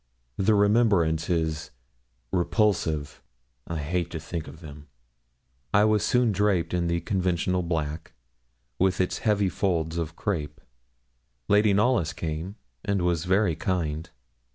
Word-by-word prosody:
The 105 +2 +3
remembrance 100 -7 +3
is 80 -2 -1 0.6
repulsive. 85 -4 0 0.5
I 85 - -3
hate 85 +3 -2
to 80 - -5
think 80 0 -5
of 70 +3 -11
them. 75 -2 -11 0.9
I 105 0 +6
was 105 -1 +2
soon 125 0 +3
draped 100 -4 +1
in 85 -1 0
the 85 0 0
conventional 90 0 0
black, 80 -2 -3 0.7
with 95 0 +2
its 90 - 0
heavy 105 -2 +2
folds 85 -4 -1
of 80 -1 -4
crape. 75 -7 -3 0.9
Lady 105 +1 +4
Knollys 105 -4 +2
came, 80 +4 -4 0.3
and 100 -3 0
was 85 -1 0
very 95 -2 +2
kind. 80 -3 -2
90 Hz, 130 wpm, -26 LUFS, 80-100 Hz, 0.9 s, I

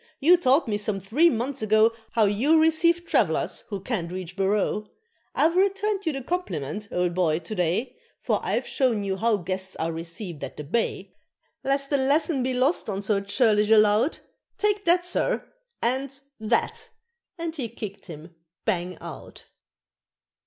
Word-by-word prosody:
You 335 +6 +6
taught 280 -4 +3
me 210 -2 -1
some 205 -1 -2
three 250 - +3
months 260 +1 -2
ago 215 +1 +4 0.2
How 225 -1 +3
you 250 +11 +3
receive 335 +2 +3
trav'lers - - 0
who 200 -2 -4
can't 190 -5 -3
reach 185 -1 -6
'Barroo;' 205 +2 0 0.5
I've 330 +2 +3
returned 395 0 +1
you - - +3
the 270 -1 -5
compliment, 205 - -3
old 180 -1 0
boy, 170 -4 +2
to 170 +5 -6
day, 180 +6 -1 0.2
For - - 0
I've - - -1
shown 245 -7 +1
you 195 -1 -2
how 225 +1 +2
guests 190 +1 -4
are 165 +1 -2
received 165 0 -7
at - - -7
the 150 - -5
Bay 225 +11 -2 0.5
Lest 275 +1 0
the 285 - +4
lesson 285 +2 +1
be 255 0 -1
lost 260 +1 +1
on 200 0 -3
so 200 -1 +1
churlish 210 0 +2
a 220 - +7
lout, 215 +7 +3 0.4
Take 415 -1 0
that, 350 +1 +4
sir! 430 +7 0 0.4
and 265 +3 0 0.2
that!" 235 - -1 0.5
and 330 -1 -4
he 255 -7 -3
kicked 210 -4 -8
him 165 0 -10 0.3
bang 180 -4 -1
out. - - -10
225 Hz, 165 wpm, -25 LUFS, 195-295 Hz, 0.5 s, a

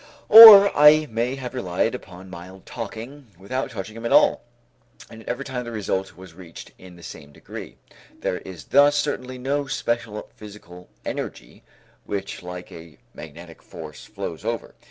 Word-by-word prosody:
Or 210 -2 +10
I 150 +1 +6
may 120 +4 -2
have 130 -2 -8
relied 90 -9 -2
upon 90 +1 -11
mild 95 +1 -12
talking 120 +5 -9
without 130 +8 -5
touching 105 0 -8
him 115 - -10
at 115 - -4
all; - - +3 0.7
and 115 - -12
yet 110 - -11
every 140 - -5
time 125 -2 -5
the 120 - -9
result 95 -4 -4
was 95 -2 -14
reached 85 -2 -13
in 90 -1 -15
the 85 - -17
same 75 -3 -12
degree. - - -11 0.4
There 90 - -3
is 95 -3 -12
thus 145 +1 +3
certainly 130 -3 -3
no 140 +3 -3
special 115 -4 -4
physical 95 -4 -14 0.2
energy - - -8 0.4
which 100 -1 -6
like 90 0 -10
a 80 -1 -14 0.2
magnetic 80 +2 -13
force - - -12
flows - - -8
over. - - -5
105 Hz, 160 wpm, -22 LUFS, 90-130 Hz, 0.7 s, Or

